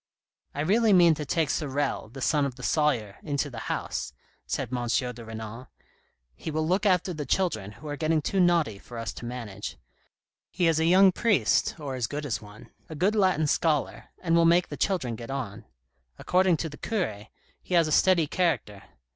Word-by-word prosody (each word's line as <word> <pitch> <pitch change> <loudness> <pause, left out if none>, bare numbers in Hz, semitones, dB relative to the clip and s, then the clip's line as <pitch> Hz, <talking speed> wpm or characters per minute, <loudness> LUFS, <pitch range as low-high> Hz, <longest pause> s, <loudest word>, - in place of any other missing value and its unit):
" - - -42
I 145 - -1
really 210 +6 +3
mean 175 -3 +6
to 150 -1 -5
take 155 0 +1
Sorel, 140 -5 -2
the 135 +3 -10
son 150 -2 +2
of 135 -3 -2
the 125 - -11
sawyer, 125 -11 0
into 145 -1 -2
the 120 - -7
house," - - -3 0.3
said 130 - -3
M. 120 -1 -2
de 125 -1 -1
Renal; 110 +2 -8 0.4
" - - -40 0.3
he - - -6
will 155 0 -1
look 190 +4 +2
after 180 -1 +2
the 150 -2 -4
children, 110 - 0
who 150 +9 -11
are 145 - -3
getting 155 +1 +1
too 190 +6 -1
naughty 170 - +2
for 120 - -11
us 115 -1 -4
to - - -9
manage. 115 -5 -6 0.7
He 180 - 0
is 160 -1 +2
a 160 - +2
young 185 +3 +6
priest, 215 +1 +2
or 140 -3 -5
as 125 -3 -2
good 145 +3 -5
as 130 - -2
one, 105 0 -14 0.2
a 160 - -7
good 185 +8 +2
Latin 185 -7 +2
scholar, 150 -1 0 0.2
and 165 -2 +2
will 170 - +5
make 170 +2 +4
the - - -5
children 155 - -1
get 115 +2 -9
on. 115 -6 -5 0.5
According 185 -2 +2
to 160 - -3
the 150 - -11
cure, 110 - -3 0.3
he 180 - -2
has 165 -2 +4
a - - -3
steady 175 +1 +4
character. 150 - -1
150 Hz, 205 wpm, -27 LUFS, 120-175 Hz, 0.7 s, mean